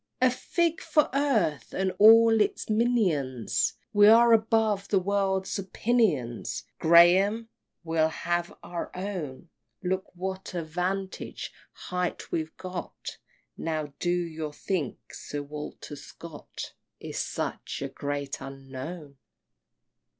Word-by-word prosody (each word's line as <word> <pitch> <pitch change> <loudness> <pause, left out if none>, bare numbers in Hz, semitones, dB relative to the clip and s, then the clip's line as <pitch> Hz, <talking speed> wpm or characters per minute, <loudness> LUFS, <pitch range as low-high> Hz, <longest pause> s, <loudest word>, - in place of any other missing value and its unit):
XVI. 255 - +5
A - - +2
fig 335 +6 0
for 300 -2 +2
earth, 225 - +1
and 190 0 +1
all 225 +1 +8
its 210 - 0
minions! 160 - +1 0.2
We 205 0 +7
are 230 +2 +7
above 220 -2 +2
the 200 - +2
world's 190 0 0
opinions, 190 - 0 0.2
Graham! 185 +7 +5 0.3
we'll 160 -1 +2
have 175 +1 -2
our 175 -1 -5
own! 175 -6 -5 0.3
Look 190 +1 -1
what 190 +1 -5
a 170 - -1
vantage 185 +4 -3 0.2
height 180 -1 -4
we've 160 -1 -3
got! 185 -1 -7 0.4
Now 155 -3 -3
do 175 - 0
you 165 -3 -2
think 160 -5 -2 0.2
Sir 145 0 -5
Walter 150 0 -7
Scott 155 +2 -9 0.3
Is - - -5
such - - -3
a - - -1
Great 140 -1 -4
Unknown? 135 +3 -8
180 Hz, 115 wpm, -28 LUFS, 155-210 Hz, 0.4 s, all